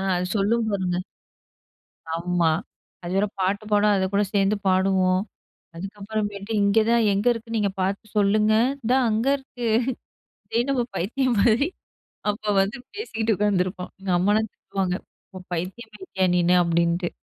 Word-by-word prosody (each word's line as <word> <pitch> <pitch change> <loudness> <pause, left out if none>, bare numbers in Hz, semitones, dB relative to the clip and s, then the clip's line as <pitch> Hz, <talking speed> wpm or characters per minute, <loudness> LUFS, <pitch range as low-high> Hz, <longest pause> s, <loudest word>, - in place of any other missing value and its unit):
அது 180 - -1
சொல்லும் 220 +3 +1
பாருங்க. 185 -3 -1 1.2
ஆமா. 170 0 +1 0.5
அது 175 +1 -5
வேற 200 +2 +3
பாட்டு 200 +3 0
பாடும் 210 0 +4
அதைக்கூட 195 +2 +1
சேர்ந்து 200 +1 +3
பாடுவோம். 185 0 +3 0.5
அதுக்கப்புறமேட்டு 205 +2 -4
"இங்க 200 +2 +3
தான் 235 -2 +4
எங்க 200 +4 -1
இருக்கு 230 0 -7
நீங்க 205 -2 +1
பார்த்து 195 +3 -1
சொல்லுங்க". 210 +1 +3 0.3
"இந்தா 245 +3 +2
அங்க 220 +4 0
இருக்கு." 245 -3 -7 0.9
இத - - +3
நம்ம 250 -3 +1
பைத்தியம் 240 +7 0
மாரி 235 +8 +4 0.6
அப்ப 210 0 -1
வந்து 200 +5 -2 0.2
பேசிகிட்டு 225 - -1
உட்காந்துருப்போம். 185 -3 0
எங்கம்மாலாம் 200 +4 +1
திட்டுவாங்க 190 -2 -3 0.6
"பைத்தியம் 190 +7 -5
மாயிட்டயா 190 -1 -1
நீனு" 180 0 +3
அப்படின்ட்டு. 170 +1 +1
200 Hz, 125 wpm, -24 LUFS, 185-220 Hz, 1.2 s, பாடும்